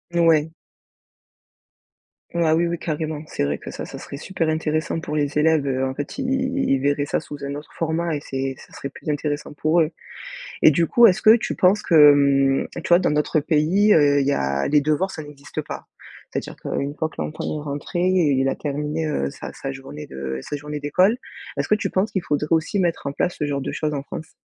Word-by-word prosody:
Ouais. 160 Hz, -2 st, +4 dB, 1.8 s
Ah 160 Hz, -2 st, +3 dB
oui 170 Hz, +1 st, +2 dB
oui, 170 Hz, 0 st, -2 dB
carrément. 155 Hz, -1 st, -3 dB
C'est 155 Hz, -, -3 dB
vrai 70 Hz, 0 st, -1 dB
que -, -, -9 dB
ça, -, -, -6 dB
ce -, -, -8 dB
serait 140 Hz, -, -8 dB
super 165 Hz, 0 st, -2 dB
intéressant 155 Hz, +1 st, -1 dB
pour 150 Hz, -1 st, -5 dB
les 145 Hz, 0 st, 0 dB
élèves. 155 Hz, -1 st, +3 dB
Heu, 130 Hz, -1 st, 0 dB
en 130 Hz, 0 st, -2 dB
fait, 145 Hz, -, -5 dB
ils 255 Hz, -2 st, -1 dB
ils 265 Hz, 0 st, 0 dB
ils 135 Hz, -, +2 dB
verraient 145 Hz, +1 st, 0 dB
ça -, -, 0 dB
sous 145 Hz, -, -9 dB
un 140 Hz, +1 st, -4 dB
autre 150 Hz, -, -9 dB
format 165 Hz, 0 st, -1 dB
et -, -, -2 dB
c'est 135 Hz, -1 st, -3 dB
ça -, -, -15 dB
serait 140 Hz, -, -6 dB
plus 145 Hz, -, -8 dB
intéressant 145 Hz, 0 st, -2 dB
pour 155 Hz, +3 st, +2 dB
eux. 155 Hz, -, +2 dB, 0.7 s
Et -, -, +8 dB
du 165 Hz, +3 st, +2 dB
coup, 235 Hz, +8 st, +6 dB
est-ce 185 Hz, -, +2 dB
que 220 Hz, +2 st, +7 dB
tu -, -, -3 dB
penses 200 Hz, +1 st, +4 dB
que, 150 Hz, -3 st, +7 dB
mmh, 135 Hz, -1 st, +3 dB, 0.2 s
tu -, -, -5 dB
vois, 175 Hz, +1 st, +7 dB
dans -, -, +1 dB
d'autres 150 Hz, +1 st, +1 dB
pays, 165 Hz, +8 st, +3 dB
heu, 145 Hz, -2 st, +5 dB
il 140 Hz, -, 0 dB
y 140 Hz, -, +3 dB
a 70 Hz, -, 0 dB
les 145 Hz, 0 st, +4 dB
devoirs, 155 Hz, +6 st, +1 dB
ça 155 Hz, -, -7 dB
n'existe 145 Hz, -1 st, -7 dB
pas? -, -, -8 dB, 0.4 s
C'est-à-dire -, -, -5 dB
qu'une 140 Hz, +1 st, -3 dB
fois 160 Hz, -, -1 dB
que -, -, -18 dB
l'enfant 75 Hz, -1 st, -4 dB
est 150 Hz, -1 st, -3 dB
rentré 145 Hz, +4 st, -4 dB
et 180 Hz, -5 st, +3 dB
il 135 Hz, 0 st, +2 dB
a -, -, -1 dB
terminé, 150 Hz, +2 st, -3 dB
heu, 70 Hz, -, -1 dB
sa -, -, -8 dB
sa 135 Hz, -, -5 dB
journée 135 Hz, -, -9 dB
de 65 Hz, 0 st, -5 dB
sa 145 Hz, -, -5 dB
journée 150 Hz, 0 st, -6 dB
d'école. 185 Hz, +9 st, +3 dB, 0.4 s
Est-ce -, -, -2 dB
que 215 Hz, -, +5 dB
tu 210 Hz, -, -2 dB
penses 195 Hz, +4 st, 0 dB
qu'il 190 Hz, -, -2 dB
faudrait 150 Hz, -1 st, -1 dB
aussi 165 Hz, +5 st, +1 dB
mettre 170 Hz, -5 st, 0 dB
en 140 Hz, -, -2 dB
place 175 Hz, +4 st, -1 dB
ce 150 Hz, -, -1 dB
genre 140 Hz, -1 st, -2 dB
de -, -, -3 dB
choses 150 Hz, -1 st, -2 dB
en 140 Hz, -, -3 dB
France? 160 Hz, +3 st, -8 dB
150 Hz, 230 wpm, -22 LUFS, 140-165 Hz, 1.8 s, Et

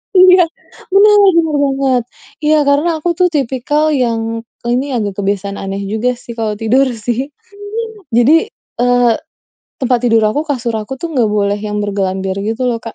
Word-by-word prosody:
Iya. 365 Hz, -1 st, +7 dB, 0.5 s
Bener, 415 Hz, +1 st, +6 dB, 0.2 s
bener 330 Hz, -, +4 dB, 0.2 s
banget. 270 Hz, -3 st, 0 dB, 0.4 s
Iya, 305 Hz, +1 st, +4 dB
karena 290 Hz, +4 st, +3 dB
aku 350 Hz, -, +1 dB
tuh 360 Hz, -, +5 dB
tipikal 290 Hz, +2 st, 0 dB
yang 230 Hz, -4 st, -1 dB, 0.2 s
ini 250 Hz, +3 st, -1 dB
agak 205 Hz, -4 st, -3 dB
kebiasaan 200 Hz, 0 st, -2 dB
aneh 195 Hz, +1 st, -4 dB
juga 245 Hz, +3 st, 0 dB
sih 240 Hz, 0 st, -11 dB
kalau 215 Hz, -2 st, -1 dB
tidur, 255 Hz, +5 st, +2 dB
sih. 240 Hz, +6 st, -3 dB, 0.8 s
Jadi, 305 Hz, -, +4 dB, 0.3 s
eee, 245 Hz, -1 st, +3 dB, 0.7 s
tempat 250 Hz, -1 st, +2 dB
tidur 225 Hz, -1 st, +3 dB
aku, 285 Hz, +8 st, 0 dB
kasur 240 Hz, -4 st, -2 dB
aku 215 Hz, +5 st, -5 dB
tuh 335 Hz, -, -4 dB
gak 245 Hz, -4 st, +2 dB
boleh 205 Hz, -1 st, 0 dB
yang 210 Hz, 0 st, -4 dB
bergelambir 190 Hz, -2 st, -2 dB
gitu 225 Hz, +4 st, -2 dB
loh, 235 Hz, -2 st, 0 dB
Kak. 230 Hz, -, -8 dB
240 Hz, 160 wpm, -15 LUFS, 215-275 Hz, 0.8 s, Iya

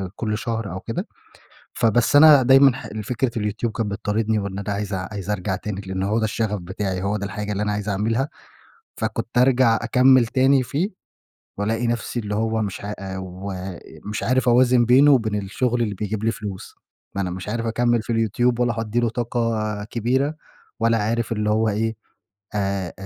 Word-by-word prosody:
كُلّ 105 Hz, -2 st, -2 dB
شهر 115 Hz, -4 st, -3 dB
أو 95 Hz, -, -5 dB
كده، -, -, -4 dB, 0.7 s
فبس 115 Hz, +4 st, +2 dB
أنا 145 Hz, -3 st, +8 dB
دايمًا 135 Hz, +1 st, +6 dB
ح 130 Hz, -, -8 dB
ال 110 Hz, -1 st, -6 dB
فكرة 125 Hz, +2 st, -1 dB
اليوتيوب 110 Hz, +2 st, -2 dB
كانت 110 Hz, -2 st, -3 dB
بتطاردني، 105 Hz, +2 st, 0 dB
وإن 100 Hz, 0 st, -4 dB
أنا 105 Hz, +1 st, -4 dB
عايز 100 Hz, 0 st, -3 dB
عايز 95 Hz, +1 st, -5 dB
أرجع 95 Hz, -1 st, -1 dB
تاني 100 Hz, -1 st, -5 dB
لأنه 95 Hz, +1 st, -3 dB
هو 110 Hz, +2 st, +2 dB
ده 110 Hz, -, +1 dB
الشغف 105 Hz, -1 st, -1 dB
بتاعي، 95 Hz, +1 st, -3 dB
هو 105 Hz, +2 st, 0 dB
ده 100 Hz, -, -4 dB
الحاجة 105 Hz, +1 st, -4 dB
اللي 105 Hz, +1 st, -1 dB
أنا 105 Hz, -, -1 dB
عايز 105 Hz, 0 st, -3 dB
أعملها، 115 Hz, +7 st, 0 dB, 0.7 s
فكنت 120 Hz, -, -3 dB
ارجع 125 Hz, -2 st, +4 dB
أكمِّل 125 Hz, +1 st, +5 dB
تاني 130 Hz, +2 st, +3 dB
فيه، 160 Hz, -, -1 dB, 0.7 s
والاقي 115 Hz, +3 st, -1 dB
نَفسي 120 Hz, +1 st, -2 dB
اللي 105 Hz, -1 st, -3 dB
هو 110 Hz, 0 st, 0 dB
مش 100 Hz, -2 st, -4 dB
ع 105 Hz, -, -3 dB, 0.2 s
ومش 95 Hz, +2 st, -7 dB
عارف 130 Hz, 0 st, +2 dB
أوازن 125 Hz, 0 st, +4 dB
بينه 135 Hz, +5 st, +6 dB
وبين 110 Hz, -5 st, +2 dB
الشغل 120 Hz, +5 st, -1 dB
اللي 105 Hz, -3 st, 0 dB
بيجيب 105 Hz, +1 st, -3 dB
لي 115 Hz, -, +2 dB
فلوس، 100 Hz, -3 st, -7 dB, 0.4 s
ما 100 Hz, -, -1 dB
أنا 90 Hz, -, -2 dB
مش 95 Hz, +3 st, -6 dB
عارف 115 Hz, +1 st, -2 dB
أكمِّل 120 Hz, 0 st, +1 dB
في 115 Hz, -, -3 dB
اليوتيوب، 115 Hz, +2 st, +1 dB
ولا 120 Hz, -2 st, +1 dB
هادِّي 115 Hz, +2 st, -1 dB
له 120 Hz, -1 st, +1 dB
طاقة 115 Hz, -3 st, -2 dB
كبيرة، 130 Hz, +7 st, -1 dB, 0.4 s
ولا 115 Hz, 0 st, +3 dB
عارف 115 Hz, +2 st, -1 dB
اللي 105 Hz, -1 st, 0 dB
هو 110 Hz, +1 st, +2 dB
إيه 110 Hz, +2 st, -1 dB, 0.6 s
أ 100 Hz, -3 st, -1 dB
أ -, -, -10 dB
110 Hz, 185 wpm, -22 LUFS, 105-120 Hz, 0.7 s, أنا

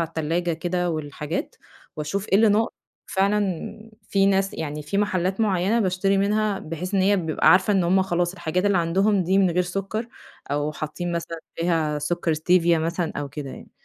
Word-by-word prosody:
على 165 Hz, -, -1 dB
التلاجة 165 Hz, +2 st, -1 dB
كده 175 Hz, +2 st, -1 dB
والحاجات 150 Hz, +1 st, -4 dB, 0.4 s
وأشوف 160 Hz, +7 st, -3 dB
إيه -, -, +1 dB
اللي 220 Hz, +1 st, +5 dB
ناقص. 215 Hz, +2 st, +2 dB, 0.3 s
فعلًا 200 Hz, +2 st, -1 dB, 0.2 s
في 195 Hz, 0 st, +3 dB
ناس 195 Hz, 0 st, +1 dB
يعني 150 Hz, -1 st, -4 dB
في 175 Hz, +7 st, -2 dB
محلّات 190 Hz, -1 st, 0 dB
معيّنة 205 Hz, +2 st, +2 dB
باشتري 195 Hz, 0 st, +1 dB
منها 210 Hz, 0 st, +1 dB
بحيث 165 Hz, +5 st, -5 dB
إن 195 Hz, -, +3 dB
هي 200 Hz, +2 st, +4 dB
بيبقى 160 Hz, -4 st, +2 dB
عارفة 185 Hz, +3 st, +5 dB
إن 190 Hz, -3 st, +2 dB
هم 190 Hz, +2 st, +3 dB
خلاص 175 Hz, -1 st, 0 dB
الحاجات 180 Hz, 0 st, -2 dB
اللي 200 Hz, -3 st, +3 dB
عندهم 190 Hz, +4 st, +2 dB
دي 190 Hz, +3 st, +2 dB
من 190 Hz, -2 st, +4 dB
غير 180 Hz, +2 st, +2 dB
سُكَّر 195 Hz, +5 st, -4 dB, 0.4 s
أو 145 Hz, +1 st, -1 dB
حاطّين 170 Hz, +4 st, -4 dB
مثلًا 170 Hz, 0 st, -4 dB, 0.2 s
فيها 160 Hz, -3 st, 0 dB
سُكَّر 170 Hz, +2 st, -1 dB
ستيفيا 170 Hz, +1 st, +3 dB
مثلًا 165 Hz, +1 st, -2 dB
أو 145 Hz, -1 st, -3 dB
كده 140 Hz, -1 st, -7 dB
يعني، -, -, -11 dB
180 Hz, 180 wpm, -24 LUFS, 165-195 Hz, 0.4 s, اللي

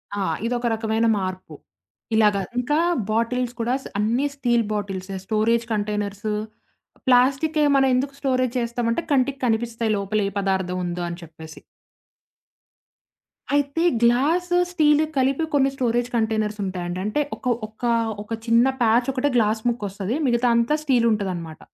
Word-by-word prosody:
ఆ! 205 Hz, -, -2 dB, 0.2 s
ఇదొక 240 Hz, +1 st, -1 dB
రకమైన 220 Hz, 0 st, 0 dB
మార్పు. 185 Hz, -1 st, -5 dB, 0.6 s
ఇలాగా. 210 Hz, -2 st, +3 dB, 0.2 s
ఇంకా 250 Hz, +5 st, +1 dB, 0.3 s
బాటిల్స్ 235 Hz, +2 st, 0 dB
కూడా 235 Hz, +2 st, 0 dB
స -, -, -20 dB
అన్ని 230 Hz, +6 st, +1 dB
స్టీల్ 240 Hz, -4 st, +1 dB
బాటిల్సే 195 Hz, -2 st, -4 dB
స్టోరేజ్ 225 Hz, +3 st, +1 dB
కంటైనర్సు, 210 Hz, 0 st, -2 dB, 0.7 s
ప్లాస్టికే 275 Hz, +5 st, +3 dB
మనం 270 Hz, -1 st, +4 dB
ఎందుకు 270 Hz, +2 st, -1 dB
స్టోరేజ్ 255 Hz, -3 st, 0 dB
చేస్తామంటే, 235 Hz, +3 st, -1 dB
కంటికి 275 Hz, 0 st, +1 dB
కనిపిస్తాయి 230 Hz, -1 st, 0 dB
లోపలే 200 Hz, +1 st, -1 dB
పదార్థం 190 Hz, -2 st, -1 dB
ఉందో 175 Hz, 0 st, -3 dB
అని 170 Hz, +1 st, -7 dB
చెప్పేసి. 160 Hz, -1 st, -12 dB, 2.0 s
అయితే 285 Hz, +3 st, +1 dB, 0.2 s
గ్లాస్, 285 Hz, +10 st, +2 dB, 0.2 s
స్టీల్ 305 Hz, -3 st, +4 dB
కలిపి 270 Hz, +4 st, +2 dB
కొన్ని 275 Hz, -1 st, +3 dB
స్టోరేజ్ 245 Hz, -1 st, 0 dB
కంటైనర్స్ 220 Hz, -2 st, 0 dB
ఉంటాయండి. 180 Hz, -1 st, -4 dB
అంటే 215 Hz, +8 st, 0 dB, 0.2 s
ఒక 250 Hz, -1 st, 0 dB
ఒక 215 Hz, +2 st, -24 dB, 0.4 s
ఒక 210 Hz, -, -22 dB, 0.2 s
చిన్న 230 Hz, +2 st, +5 dB, 0.2 s
ప్యాచ్ 235 Hz, +3 st, +3 dB
ఒకటే 275 Hz, +2 st, 0 dB
గ్లాస్ 220 Hz, -1 st, +2 dB
ముక్కొస్తది. 205 Hz, 0 st, -3 dB
మిగతాదంతా 240 Hz, +3 st, +2 dB
స్టీల్ 255 Hz, -5 st, +2 dB
ఉంటదన్నమాట. 180 Hz, -7 st, -3 dB
230 Hz, 125 wpm, -23 LUFS, 210-255 Hz, 2.0 s, చిన్న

